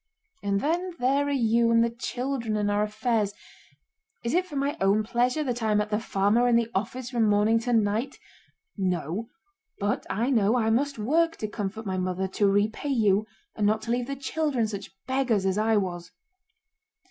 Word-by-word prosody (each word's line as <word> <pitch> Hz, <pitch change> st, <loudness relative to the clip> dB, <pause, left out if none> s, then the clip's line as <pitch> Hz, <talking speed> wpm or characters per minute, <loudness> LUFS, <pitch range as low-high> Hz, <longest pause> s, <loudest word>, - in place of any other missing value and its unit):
And 200 Hz, 0 st, 0 dB
then 345 Hz, +3 st, -1 dB
there 275 Hz, +2 st, +1 dB
are -, -, -1 dB
you 235 Hz, -3 st, +2 dB
and 230 Hz, 0 st, +5 dB
the 235 Hz, -, 0 dB
children 240 Hz, -1 st, -3 dB
and 205 Hz, -1 st, 0 dB
our 205 Hz, 0 st, +1 dB
affairs. 215 Hz, -1 st, 0 dB, 0.9 s
Is 235 Hz, -, -1 dB
it 365 Hz, +2 st, +2 dB
for 300 Hz, -, -9 dB
my 280 Hz, +1 st, 0 dB
own 200 Hz, +3 st, +3 dB
pleasure 245 Hz, +6 st, +1 dB
that 245 Hz, -4 st, -3 dB
I 220 Hz, -1 st, +1 dB
am 210 Hz, -, +3 dB
at 210 Hz, +1 st, -2 dB
the 210 Hz, -, +1 dB
farm 205 Hz, 0 st, +1 dB
or 245 Hz, -, +3 dB
in 240 Hz, -, +4 dB
the 235 Hz, -1 st, +1 dB
office 240 Hz, +5 st, -3 dB
from 235 Hz, -3 st, +2 dB
morning 210 Hz, +2 st, +3 dB
to 245 Hz, +2 st, -3 dB
night? 225 Hz, +4 st, +1 dB, 0.6 s
No, 185 Hz, -, -2 dB, 0.5 s
but 205 Hz, 0 st, -1 dB
I 230 Hz, +7 st, 0 dB
know 225 Hz, -1 st, +3 dB
I 225 Hz, -2 st, +1 dB
must 275 Hz, +4 st, +1 dB
work 330 Hz, +10 st, +1 dB
to 215 Hz, -, -4 dB
comfort 210 Hz, +1 st, -5 dB
my 190 Hz, -1 st, -2 dB
mother, 185 Hz, +1 st, -1 dB
to 200 Hz, +2 st, +1 dB
repay 210 Hz, +7 st, +1 dB
you, 215 Hz, -5 st, +2 dB, 0.3 s
and 210 Hz, -1 st, +1 dB
not 215 Hz, +1 st, +1 dB
to 230 Hz, -, -3 dB
leave 245 Hz, 0 st, 0 dB
the 275 Hz, -, -3 dB
children 275 Hz, -3 st, -1 dB
such 205 Hz, -2 st, -6 dB, 0.2 s
beggars 260 Hz, -7 st, +1 dB
as 190 Hz, +2 st, +1 dB
I 220 Hz, 0 st, +3 dB
was." 175 Hz, -3 st, -3 dB
225 Hz, 195 wpm, -26 LUFS, 205-250 Hz, 0.9 s, and